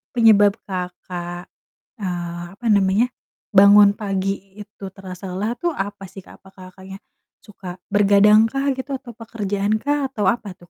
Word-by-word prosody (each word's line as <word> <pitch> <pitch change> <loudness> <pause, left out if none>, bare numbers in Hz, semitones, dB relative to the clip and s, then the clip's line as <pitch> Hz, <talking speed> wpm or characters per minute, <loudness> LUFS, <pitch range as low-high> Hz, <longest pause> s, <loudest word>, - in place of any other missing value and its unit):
penyebab 205 -3 +5
Kakak, 180 -1 -6 0.5
eee, 175 -2 -4
apa 235 +2 -6
namanya, 200 +4 +3 0.4
bangun 200 0 +7
pagi 195 -1 -2 0.2
itu 205 -1 -11
terasa 190 -1 -9
lelah 210 +5 -2
tuh 345 -1 0
apa 200 0 -5
sih, 190 +1 -11
Kak? - - -16
Apa, 190 - -17
Kakaknya, 190 +1 -12 0.4
suka 190 -4 -10 0.2
bergadang 205 +2 +5
kah 275 +4 -1
gitu 265 +1 -5
atau 255 -2 -9
pekerjaan 205 -2 -2
kah 290 -1 0
atau 220 -6 -3
apa 205 -6 -6
tuh, 175 - -19
200 Hz, 145 wpm, -21 LUFS, 190-220 Hz, 0.5 s, bangun